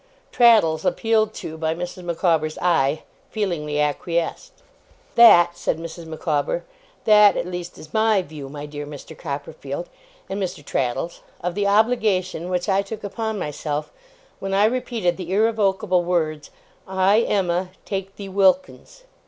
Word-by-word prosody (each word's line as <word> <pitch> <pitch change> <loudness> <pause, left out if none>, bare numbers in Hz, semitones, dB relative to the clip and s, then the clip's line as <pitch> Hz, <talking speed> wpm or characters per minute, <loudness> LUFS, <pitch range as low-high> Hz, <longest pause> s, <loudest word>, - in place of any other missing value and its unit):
Traddles, 215 -11 +5
appealed 220 -1 +1
to 160 0 -7
by 160 0 0
Mrs. 180 +1 -6
Micawber's 165 -2 0
eye, 160 -4 +1 0.3
feelingly 165 -8 -2
acquiesced. 170 - -2 0.5
'That,' 175 -7 +7
said 175 - -1
Mrs. 165 0 -8
Micawber, 160 - -1 0.4
'that, 210 -2 +6
at - - -1
least, 175 -1 -6
is 155 - -13
my 220 -3 +3
view, 145 -3 -9
my 145 +1 -7
dear 145 0 -7
Mr. 150 +2 -10
Copperfield 140 +2 -6 0.4
and 200 +1 -4
Mr. 180 -6 -4
Traddles, 135 +6 -2 0.2
of 180 +1 -2
the 200 +1 0
obligation 200 -5 +1
which 180 +1 -1
I 195 -1 +3
took 215 +2 -8
upon 220 +1 -3
myself 150 -2 -4 0.5
when 195 0 -2
I 200 +2 +5
repeated 225 -6 0
the 180 -2 -6
irrevocable 195 -3 +2
words, 160 -4 -1 0.4
"I, 190 +3 +3
Emma, 185 -4 0 0.2
take 195 -1 -4
thee, 200 - -8
Wilkins." 200 - +1
180 Hz, 140 wpm, -22 LUFS, 160-205 Hz, 0.5 s, That